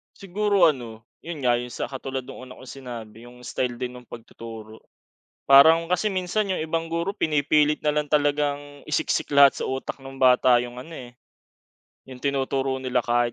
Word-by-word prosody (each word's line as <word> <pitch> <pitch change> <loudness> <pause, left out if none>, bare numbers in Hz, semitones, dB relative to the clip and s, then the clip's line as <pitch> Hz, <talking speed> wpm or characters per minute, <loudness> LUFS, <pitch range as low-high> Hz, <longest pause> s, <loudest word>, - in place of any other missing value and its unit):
Siguro 200 0 0
ano, 115 -5 -6 0.2
yun 165 -5 -8
nga 120 -1 +3
yun 125 0 -7
sa - - -4
katulad 135 -1 -5
nung 135 - -11
una 130 - -12
kong 130 - -13
sinabi 115 -3 -9
yung 125 0 -15
style 125 0 -3
din 125 0 -6
nung 125 - -20
pag-tuturo, 115 -1 -11 0.7
parang 160 +5 +7
kasi 180 +4 +1
minsan 195 +2 -1
yung 185 -4 -1
ibang 165 +1 -2
guro 170 +4 -2
pini-pilit 150 -3 +1
nalang 150 -1 0
talagang 145 -1 0
isik-sik 150 - 0
lahat 140 -1 +6
sa - - -2
utak 130 +1 -4
nung 135 0 -10
bata 125 -1 +5
yung 120 0 -8
ano, 165 +5 -11
eh, 120 -1 -10 0.9
yung 130 -1 -12
tinuturo 135 -1 -1
nila 125 -1 0
kahit 120 0 0
135 Hz, 170 wpm, -24 LUFS, 125-155 Hz, 0.9 s, parang